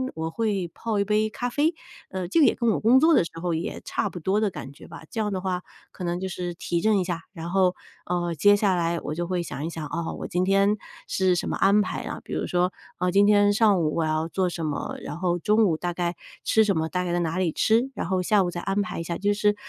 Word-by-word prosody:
我 160 0 -3
会 200 -2 -1
泡 220 -3 -2
一 - - +3
杯 215 +1 +2
咖 245 +3 -3
啡。 305 +6 +1 0.3
呃， 185 -2 -4
这 265 - +2
个 295 - +7
也 - - +3
跟 235 -2 +1
我 - - 0
工 240 +4 +5
作 325 +2 +5
的 185 - +5
时 - - -6
候 175 -2 -1
也 160 +2 -3
差 - - -1
不 175 - -8
多 195 +6 +1
的 210 - +2
感 135 -6 -8
觉 - - -14
吧， - - -11
这 225 - -2
样 210 -1 -1
的 185 -1 -2
话 185 -1 -2 0.3
可 185 - -9
能 175 +1 -1
就 190 - -3
是 175 -1 -4
提 170 0 -2
振 215 -2 +3
一 - - +1
下， 175 -2 -3
然 170 0 -6
后， 185 -2 +3 0.3
呃， 175 -1 -1
接 205 +5 +5
下 200 -2 +2
来 170 -1 0
我 150 - -4
就 170 +1 -3
会 180 -2 -1
想 145 - -6
一 - - -2
想， 160 -2 -6
啊， 165 +2 -3
我 - - -6
今 180 -1 0
天 195 +2 +3 0.3
是 185 -1 +2
什 - - -2
么 - - -1
安 205 +2 +4
排 - - -3
啊， - - -5
比 - - -8
如 - - -2
说， 180 +1 +1 0.2
啊， 180 0 0
今 200 +2 +5
天 205 -1 +5
上 205 -3 +4
午 155 -1 0
我 165 - +2
要 155 +1 0
做 185 +1 0
什 165 -2 -4
么， 150 - -3
然 160 - -6
后 175 -1 +1
中 215 +5 +3
午 160 -4 +1
大 175 0 -3
概 175 0 -2 0.3
吃 220 - +4
什 200 -4 +1
么， 160 0 -1
大 180 +1 -1
概 175 -1 -2
在 175 - +1
哪 165 +1 -1
里 180 -4 +1
吃， 235 - +2
然 - - -4
后 185 -1 0
下 205 0 +3
午 175 - -1
再 175 - -5
安 195 +1 0
排 185 - -4
一 - - -3
下， 170 +1 -4
就 205 +1 +1
是 210 0 +2
185 Hz, 300 characters per minute, -25 LUFS, 170-205 Hz, 0.3 s, 个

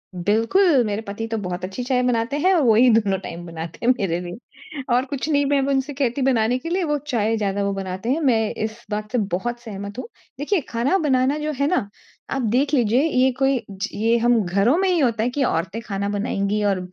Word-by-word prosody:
बिल्कुल। 230 - +3
मेरे 210 0 -2
पति 215 +1 -5
तो 225 0 -3
बहुत 180 0 -4
अच्छी 195 +7 -5
चाय 250 0 +1
बनाते 250 +3 0
हैं 370 +5 +3
और 340 - +3
वो 230 -3 +5
ही 250 +3 +6
दोनों 205 -4 +2
टाइम 175 -2 -8
बनाते 165 +4 -7
हैं 250 - +6
मेरे 175 -3 -1
लिए। 230 - -10
और 250 +2 +2
कुछ 280 +1 -4
नहीं 285 -2 +2
मैं 280 0 +2
अब 270 - -1
उनसे 275 +1 0
कहती 270 -1 -1
बनाने 245 -2 +2
के 330 - -6
लिए 365 +2 0
वो 295 -2 0
चाय 225 -4 +1
ज़्यादा 200 -1 -1
वो 200 0 -1
बनाते 190 +2 -4
हैं, 305 - +1
मैं 225 -7 +2
इस 220 +2 -5
बात 210 +1 -3
से 250 - 0 0.2
बहुत 240 +7 -2
सहमत 200 -3 -8
हूँ। 255 - -6 0.3
देखिए 315 +4 0
खाना 245 +11 +1
बनाना 275 -3 +1
जो 305 0 -2
है 280 - +2
ना, 300 - 0 0.4
आप 270 - -1
देख 255 +6 +1
लीजिए 240 -2 +3
ये 260 -5 +3
कोई 270 -2 +2
ज 195 +3 -4
ये 225 +3 +2
हम 240 0 +3
घरों 200 - +2
में 385 +1 +2
ही 355 -3 +2
होता 230 -5 +1
है 240 - +1
कि 275 +3 -1
औरतें 190 0 -1
खाना 200 -2 -3
बनाएँगी 205 0 -1
और 200 -2 +1
235 Hz, 230 wpm, -22 LUFS, 205-275 Hz, 0.4 s, ही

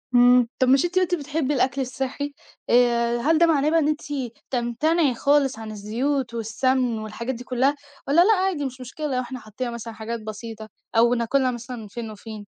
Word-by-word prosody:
امم، 245 0 +6
طَب 255 - +3
مش 270 +6 +5
أنتِ 360 +1 +1
قُلتِ 360 -1 +1
بتحبّي 295 -1 -2
الأكْل 265 +1 +1
الصحّي، 270 +3 -3 0.4
آآ، 235 -1 +3
هل 310 +7 +2
ده 340 - +6
معناه 305 -3 +3
بقى 330 +1 +3
إن 300 - +1
أنتِ 305 +1 0 0.5
تمتنعي 265 +5 +1
خالص 280 -3 +2
عن 220 -1 -7
الزيوت 235 +5 -2
والسَّمن 235 +1 0
والحاجات 230 +4 -4
دي 245 - -8
كلّها، 260 +3 +1 0.3
والَّا 295 +5 +5
لأ 440 +5 +6
عادي 370 -7 0
مش 255 0 -6
مشكلة 300 +5 -5
لو 255 - +1
إحنا 255 +1 -7
حطّينا 235 +3 -5
مثلًا 230 -1 -7
حاجات 225 +1 -5
بسيطة 220 0 -8 0.3
أو 235 +2 +5
ناكلها 255 +2 +1
مثلًا 245 +1 -7
من 220 -2 -8
فين 225 +1 -6
وفين؟ 215 0 -9
250 Hz, 190 wpm, -24 LUFS, 235-285 Hz, 0.5 s, امم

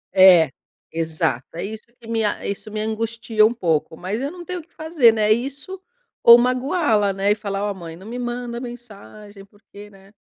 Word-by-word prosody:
É, 180 -6 +7 0.4
exato. 160 -6 -2
É - - -4
isso 215 +2 -7
que 230 - -15
me 225 -1 -1
a 210 - -2
isso 200 +2 -5
me 215 - -4
angustia 220 0 -1
pouco, 160 -5 -1
mas 200 +6 -4
eu 275 - -2
não 350 +1 -10
tenho 365 +1 -5
o - - -11
que 335 - -31
fazer, 315 -7 +3
né. 220 -1 -1
É 215 - +6
isso 275 - -6 0.4
ou 235 0 +9
magoá-la, 250 - +1
né. 195 +2 +1
E - - +3
falar: 205 -1 -3
"oh 205 - -2
mãe, 170 -3 -9
não 185 +4 -14
me 240 +3 -6
manda 240 -1 -4
mensagem, 215 -4 -11
porque 205 0 -15
né 195 0 -19
215 Hz, 200 wpm, -21 LUFS, 195-240 Hz, 0.4 s, ou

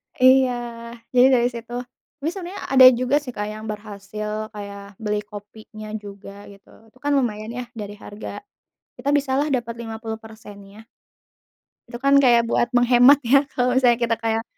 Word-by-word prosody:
Iya, 260 0 +5 0.6
jadi 250 +1 +7
dari 240 -1 +3
situ 235 0 -9 0.4
tapi 295 +3 -2
sebenarnya 385 +1 -7
ada 260 -1 +8
juga 255 +3 0
sih, 275 - -9
Kak, 210 -3 -4
yang 215 +1 -7
berhasil 210 +1 -6
kayak 200 -1 -10
beli 210 -1 -2
kopinya 215 +1 -11
juga 200 -1 -10
gitu, 200 -1 -17 0.2
itu 235 - -25
kan 290 +2 -1
lumayan 230 -4 -1
ya 245 -1 -6
dari 205 -1 -6
harga 205 0 -9 0.6
kita 260 +3 -3
bisalah 275 +1 0
dapat 235 -2 -2
50%-nya. 220 -2 -9 1.0
Itu 240 - -7
kan 280 0 +5
kayak 235 -2 +5
buat 240 - +2
menghemat 245 +3 +6
ya 260 +4 +5
kalau 250 -2 0
misalnya 245 -2 +3
kita 230 -1 +1
kayak 225 0 0
225 Hz, 150 wpm, -22 LUFS, 210-250 Hz, 1.0 s, ada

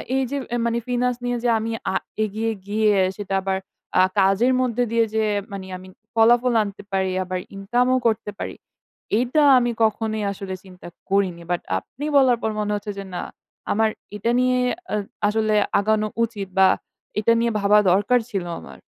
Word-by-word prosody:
এই 265 - +2
যে 285 - -1 0.3
মানে 235 0 +1
ফিনান্স 250 0 +1
নিয়ে 245 0 0
যে 245 - +2
আমি 225 +1 -3 0.2
আ - - -3 0.3
এগিয়ে 215 +2 -1 0.2
গিয়ে, 210 0 +2 0.2
সেটা 200 -2 -5
আবার 190 0 -1 0.4
আ - - +8 0.2
কাজের 195 +7 +4
মধ্যে 245 -1 +1
দিয়ে 230 0 +3
যে, 220 - +2 0.3
মানে 195 -1 -6
আমি 185 +1 -13 0.3
ফলাফল 240 +2 +4
আনতে 205 0 -8
পারি 190 -1 0
আবার 185 0 -3 0.2
ইনকাম 220 +6 +1
ও - - +4
করতে 215 -2 -1
পারি। - - -4 0.6
এইটা 250 +6 +2 0.2
আমি 240 -1 0
কখনোই 220 0 0
আসলে 195 -1 -6
চিন্তা 180 -2 -13 0.2
করিনি। 190 -3 +1
বাট 175 - 0 0.2
আপনি 285 +4 -9
বলার 255 -3 +5
পর 220 - +1
মনে 210 0 -1
হচ্ছে 205 0 -4
যে - - -4
না, 175 - -2 0.5
আমার 220 +1 +3 0.3
এটা 230 +4 0
নিয়ে 255 0 +2 0.3
আ - - +2 0.3
আসলে 215 0 +1 0.2
আগানো 215 +1 +1 0.2
উচিত 215 -4 -3
বা 190 - +8 0.5
এটা 215 +2 +3
নিয়ে 235 0 +1
ভাবা 200 +1 +4
দরকার 205 +7 +3
ছিল 195 -3 -2 0.2
আমার। - - -12
215 Hz, 175 wpm, -23 LUFS, 195-235 Hz, 0.6 s, আ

